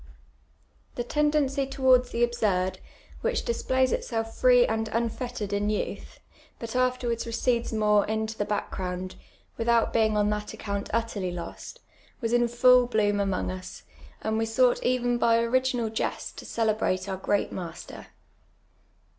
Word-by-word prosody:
The 240 Hz, -, -2 dB
teinlcnoy 285 Hz, 0 st, +1 dB
towards 260 Hz, -2 st, +3 dB
the 235 Hz, -, 0 dB
absurd, 205 Hz, -6 st, 0 dB, 0.4 s
wliicli -, -, 0 dB
displays 260 Hz, -, +1 dB
itself 225 Hz, -1 st, -2 dB
free -, -, +5 dB
and 225 Hz, -, -1 dB
unfettered 230 Hz, -2 st, -3 dB
in 205 Hz, +1 st, 0 dB
youth, 210 Hz, -, -4 dB, 0.4 s
but 230 Hz, -1 st, -7 dB
aftiTwards 250 Hz, -2 st, 0 dB
recedes 235 Hz, +1 st, 0 dB
more 210 Hz, -2 st, +3 dB
into 220 Hz, +1 st, -2 dB
the 205 Hz, -, -1 dB
back;^n>uiul, 185 Hz, -3 st, -3 dB, 0.5 s
without 230 Hz, 0 st, +2 dB
bein*; 220 Hz, -2 st, +2 dB
on 210 Hz, 0 st, +2 dB
that 210 Hz, 0 st, -4 dB
account 200 Hz, -1 st, -4 dB
utterly 225 Hz, -5 st, -1 dB
lost, 175 Hz, -1 st, -8 dB, 0.4 s
was 230 Hz, -1 st, -2 dB
ill 240 Hz, 0 st, +4 dB
full 250 Hz, +1 st, +5 dB
bloom 205 Hz, -3 st, +1 dB
amon<^ 195 Hz, -3 st, -1 dB
us, 185 Hz, -, -11 dB, 0.4 s
and 220 Hz, 0 st, 0 dB
we 225 Hz, -, +1 dB
Kou^;ht 245 Hz, +2 st, +2 dB
even 245 Hz, -1 st, +1 dB
])y 230 Hz, -1 st, +4 dB
ori<;inal 235 Hz, -1 st, 0 dB
jests -, -, -2 dB
to -, -, -11 dB
cehbrate 215 Hz, -4 st, 0 dB
our 190 Hz, -1 st, -4 dB
^reat 205 Hz, +1 st, 0 dB
master. 175 Hz, -3 st, -8 dB
230 Hz, 140 wpm, -27 LUFS, 210-245 Hz, 0.5 s, free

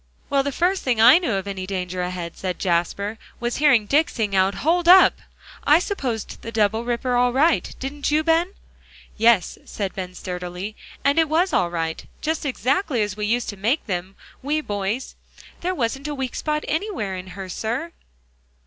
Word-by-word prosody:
"Well, 280 Hz, -1 st, +4 dB
the 280 Hz, +1 st, -2 dB
first 360 Hz, +6 st, +1 dB
thing 245 Hz, -4 st, 0 dB
I 245 Hz, +9 st, +8 dB
knew 330 Hz, -, -1 dB
of 195 Hz, 0 st, -2 dB
any 190 Hz, -2 st, -4 dB
danger 185 Hz, -1 st, -3 dB
ahead," 180 Hz, -2 st, -4 dB
said 185 Hz, -2 st, -4 dB
Jasper, 195 Hz, +5 st, -1 dB, 0.2 s
"was 240 Hz, 0 st, -2 dB
hearing 270 Hz, -7 st, +4 dB
Dick 300 Hz, +9 st, +3 dB
sing 210 Hz, -4 st, -2 dB
out 190 Hz, +1 st, +3 dB
'Hold 340 Hz, +1 st, +2 dB
up!' 370 Hz, +2 st, +7 dB, 0.4 s
I 300 Hz, -, +6 dB
supposed 265 Hz, -, -3 dB
the 230 Hz, -, -7 dB
double 220 Hz, 0 st, +1 dB
ripper 245 Hz, +1 st, -1 dB
all 245 Hz, 0 st, +3 dB
right; 305 Hz, +6 st, +2 dB
didn't 280 Hz, +2 st, -3 dB
you, 305 Hz, +1 st, +2 dB
Ben?" 335 Hz, +4 st, +2 dB, 0.6 s
"Yes," 225 Hz, -4 st, +3 dB
said 195 Hz, -3 st, -4 dB
Ben 185 Hz, -1 st, -6 dB
sturdily, 180 Hz, +3 st, -6 dB, 0.3 s
"and 280 Hz, +3 st, +3 dB
it 320 Hz, -2 st, +3 dB
was 345 Hz, +4 st, +2 dB
all 175 Hz, -, +2 dB
right; 165 Hz, -1 st, -3 dB, 0.2 s
just 315 Hz, -1 st, -2 dB
exactly 265 Hz, -, 0 dB
as 205 Hz, -2 st, -3 dB
we 210 Hz, 0 st, -2 dB
used 240 Hz, +2 st, 0 dB
to 205 Hz, -, -6 dB
make 230 Hz, +10 st, 0 dB
them, 185 Hz, -1 st, -4 dB, 0.3 s
we 295 Hz, +3 st, 0 dB
boys; 205 Hz, -1 st, -3 dB, 0.5 s
there 365 Hz, +2 st, -2 dB
wasn't 270 Hz, +1 st, -2 dB
a 295 Hz, -, -3 dB
weak 265 Hz, -3 st, -3 dB
spot 300 Hz, -1 st, -2 dB
anywhere 315 Hz, -, -2 dB
in 185 Hz, 0 st, -7 dB
her, 195 Hz, -1 st, -5 dB
sir." 235 Hz, -, -3 dB
235 Hz, 185 wpm, -23 LUFS, 195-300 Hz, 0.6 s, I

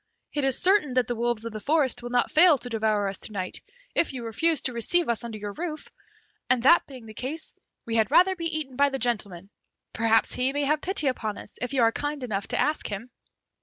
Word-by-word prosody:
It 290 Hz, -, -1 dB
is 270 Hz, -2 st, +2 dB
certain 365 Hz, -8 st, +3 dB
that 255 Hz, -1 st, +2 dB
the 240 Hz, -, -3 dB
wolves 235 Hz, -1 st, -1 dB
of 230 Hz, -, -5 dB
the 215 Hz, -, -5 dB
forest 285 Hz, -3 st, +2 dB
will 240 Hz, -, -6 dB
not 245 Hz, 0 st, +1 dB
fail 325 Hz, -1 st, +6 dB
to 245 Hz, -, -7 dB
devour 215 Hz, -3 st, 0 dB
us 195 Hz, -, -4 dB
to -, -, -8 dB
night, 185 Hz, -3 st, -4 dB, 0.3 s
if 325 Hz, -, +1 dB
you 245 Hz, -3 st, -6 dB
refuse 315 Hz, +8 st, +2 dB
to 255 Hz, -, -2 dB
receive 330 Hz, +9 st, +1 dB
us 235 Hz, -1 st, -1 dB
under 230 Hz, -2 st, -6 dB
your 205 Hz, -1 st, -6 dB
roof, 315 Hz, -, -6 dB, 0.6 s
and 255 Hz, -2 st, +2 dB
that 340 Hz, +6 st, +5 dB
being 255 Hz, -4 st, -11 dB
the 220 Hz, -, -11 dB
case, 280 Hz, +9 st, -6 dB, 0.3 s
we 230 Hz, 0 st, -1 dB
had 220 Hz, -1 st, +2 dB
rather 375 Hz, +2 st, +5 dB
be 335 Hz, -2 st, -6 dB
eaten 310 Hz, -5 st, -3 dB
by 285 Hz, +2 st, +3 dB
the 270 Hz, -, -3 dB
gentleman; 200 Hz, -7 st, -2 dB, 0.4 s
perhaps 225 Hz, 0 st, +2 dB
he 255 Hz, +1 st, 0 dB
may 290 Hz, 0 st, -1 dB
have 300 Hz, +2 st, +1 dB
pity 370 Hz, -5 st, +1 dB
upon 220 Hz, -5 st, -2 dB
us, -, -, -11 dB
if 250 Hz, +3 st, -2 dB
you 250 Hz, -, +3 dB
are 225 Hz, -, +4 dB
kind 290 Hz, +2 st, -4 dB
enough 205 Hz, -5 st, -3 dB
to -, -, -2 dB
ask 305 Hz, +1 st, 0 dB
him." 220 Hz, +5 st, -6 dB
250 Hz, 240 wpm, -26 LUFS, 225-295 Hz, 0.6 s, fail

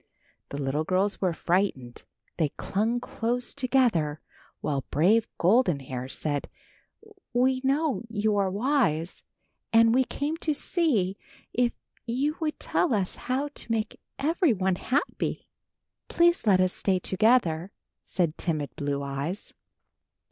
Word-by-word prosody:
The 140 Hz, -, -5 dB
little 140 Hz, +2 st, 0 dB
girls 190 Hz, +4 st, 0 dB
were 185 Hz, -2 st, +2 dB
frightened. 165 Hz, -8 st, -1 dB, 0.4 s
They 155 Hz, -4 st, +2 dB
clung 225 Hz, +5 st, 0 dB
close 240 Hz, +1 st, -2 dB
together 235 Hz, -, +1 dB, 0.4 s
while 140 Hz, -3 st, -1 dB
brave 200 Hz, +9 st, +3 dB
Golden 180 Hz, -, +3 dB
Hair 130 Hz, -1 st, -6 dB
said, 145 Hz, 0 st, -3 dB, 0.8 s
"we 255 Hz, +1 st, +2 dB
know 280 Hz, +2 st, +1 dB
you 215 Hz, -1 st, +1 dB
are 200 Hz, -2 st, +2 dB
wise 200 Hz, -, 0 dB, 0.5 s
and 230 Hz, 0 st, +6 dB
we 260 Hz, +1 st, +4 dB
came 290 Hz, +5 st, -3 dB
to 310 Hz, -3 st, -1 dB
see 230 Hz, -, +1 dB, 0.3 s
if 245 Hz, 0 st, +2 dB, 0.3 s
you 275 Hz, +6 st, 0 dB
would 310 Hz, -2 st, -2 dB
tell 290 Hz, -10 st, +1 dB
us 190 Hz, -3 st, -1 dB
how 265 Hz, +4 st, -2 dB
to 280 Hz, -, -7 dB
make 220 Hz, -1 st, -1 dB, 0.2 s
everyone 245 Hz, -, +1 dB
happy." 280 Hz, +9 st, -1 dB, 0.6 s
"Please 345 Hz, -7 st, +3 dB
let 190 Hz, -3 st, +6 dB
us 185 Hz, 0 st, +2 dB
stay 190 Hz, -2 st, +1 dB
together," 190 Hz, -3 st, +2 dB, 0.3 s
said 170 Hz, -4 st, -1 dB
timid 150 Hz, -7 st, -2 dB
Blue 140 Hz, -1 st, -2 dB
Eyes. 140 Hz, +7 st, -4 dB
205 Hz, 125 wpm, -27 LUFS, 165-255 Hz, 0.8 s, and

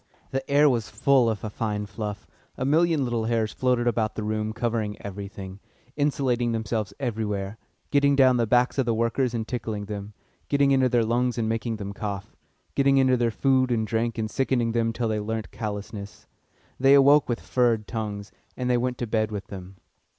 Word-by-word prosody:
The 135 Hz, -, -1 dB
air 145 Hz, +1 st, +5 dB
was 120 Hz, -6 st, +1 dB
full 125 Hz, +2 st, +3 dB
of 110 Hz, -2 st, -3 dB
a 110 Hz, -, -3 dB
fine 105 Hz, -1 st, -2 dB
fluff 105 Hz, 0 st, -6 dB, 0.3 s
a 130 Hz, -, -2 dB
million 160 Hz, +1 st, +3 dB
little 120 Hz, -3 st, -1 dB
hairs 110 Hz, -2 st, 0 dB
floated 125 Hz, -2 st, +1 dB
about 115 Hz, -3 st, 0 dB
the 110 Hz, -, -3 dB
room 110 Hz, 0 st, -1 dB
covering 110 Hz, -2 st, -2 dB
everything, 100 Hz, -1 st, -7 dB, 0.4 s
insinuating 130 Hz, -5 st, +1 dB
themselves 110 Hz, -2 st, -2 dB
everywhere, 105 Hz, -5 st, -3 dB, 0.3 s
getting 140 Hz, 0 st, +4 dB
down 130 Hz, -2 st, +5 dB
the 115 Hz, -1 st, +1 dB
backs 125 Hz, +4 st, +2 dB
of 130 Hz, -, +1 dB
the 115 Hz, -, +2 dB
workers 115 Hz, +2 st, 0 dB
and 110 Hz, -1 st, -3 dB
tickling 110 Hz, -4 st, -4 dB
them, 105 Hz, 0 st, -6 dB, 0.4 s
getting 140 Hz, -1 st, +3 dB
into 130 Hz, -1 st, +4 dB
their 120 Hz, -2 st, +2 dB
lungs 120 Hz, +2 st, 0 dB
and 115 Hz, -2 st, 0 dB
making 115 Hz, +1 st, -1 dB
them 100 Hz, -1 st, -6 dB
cough, 100 Hz, -1 st, -5 dB, 0.4 s
getting 140 Hz, 0 st, +3 dB
into 130 Hz, -1 st, +4 dB
their 120 Hz, -1 st, +1 dB
food 130 Hz, +2 st, +2 dB
and 110 Hz, -2 st, +1 dB
drink 115 Hz, +2 st, -1 dB
and 110 Hz, -1 st, -2 dB
sickening 125 Hz, -3 st, +1 dB
them 115 Hz, 0 st, +1 dB
till 115 Hz, 0 st, -2 dB
they 110 Hz, -1 st, 0 dB
learnt 110 Hz, +1 st, -4 dB
callousness. 105 Hz, -1 st, -6 dB, 0.5 s
They 135 Hz, +2 st, +6 dB
awoke 140 Hz, +1 st, +6 dB
with 120 Hz, -, 0 dB
"furred" 120 Hz, -4 st, +1 dB
tongues, 105 Hz, -2 st, -5 dB, 0.3 s
and 125 Hz, -1 st, 0 dB
they 125 Hz, -, +3 dB
went 125 Hz, 0 st, -1 dB
to 120 Hz, -, -2 dB
bed 110 Hz, -1 st, 0 dB
with 100 Hz, -2 st, -5 dB
them. 95 Hz, -1 st, -9 dB
115 Hz, 190 wpm, -25 LUFS, 105-125 Hz, 0.5 s, They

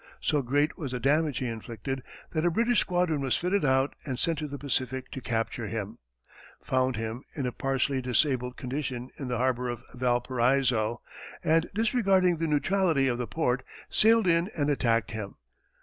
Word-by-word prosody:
So 150 Hz, -, +1 dB
great 145 Hz, +5 st, 0 dB
was 140 Hz, -6 st, -4 dB
the 125 Hz, -, -2 dB
damage 145 Hz, +2 st, +2 dB
he 130 Hz, -, -1 dB
inflicted, 115 Hz, +3 st, -5 dB, 0.3 s
that 155 Hz, -1 st, 0 dB
a 175 Hz, -, +4 dB
British 235 Hz, +6 st, +2 dB
squadron 175 Hz, -5 st, +1 dB
was 135 Hz, -2 st, +1 dB
fitted 190 Hz, +3 st, 0 dB
out 135 Hz, 0 st, +2 dB
and 130 Hz, -4 st, -3 dB
sent 165 Hz, +3 st, +1 dB
to 155 Hz, -, -3 dB
the 140 Hz, 0 st, -6 dB
Pacific 130 Hz, -2 st, -2 dB
to 135 Hz, -, -6 dB
capture 115 Hz, -1 st, -2 dB
him, 105 Hz, -1 st, -5 dB, 0.6 s
found 130 Hz, -1 st, 0 dB
him 115 Hz, +4 st, -4 dB
in 140 Hz, -, -2 dB
a 125 Hz, -, -1 dB
partially 135 Hz, +1 st, 0 dB
disabled 125 Hz, 0 st, +1 dB
condition 130 Hz, -1 st, -4 dB
in 135 Hz, -, -4 dB
the 125 Hz, -1 st, -1 dB
harbor 125 Hz, 0 st, 0 dB
of 120 Hz, -1 st, -5 dB
Valparaiso, 125 Hz, -1 st, +1 dB, 0.4 s
and, 165 Hz, +2 st, +3 dB
disregarding 195 Hz, -6 st, +3 dB
the 165 Hz, +1 st, -1 dB
neutrality 155 Hz, -1 st, +2 dB
of 120 Hz, -2 st, 0 dB
the 120 Hz, -, -2 dB
port, 125 Hz, +6 st, 0 dB, 0.3 s
sailed 225 Hz, 0 st, +5 dB
in 170 Hz, +1 st, +3 dB
and 145 Hz, -1 st, +2 dB
attacked 115 Hz, -5 st, +1 dB
him. 110 Hz, -3 st, -5 dB
135 Hz, 175 wpm, -28 LUFS, 125-155 Hz, 0.6 s, sailed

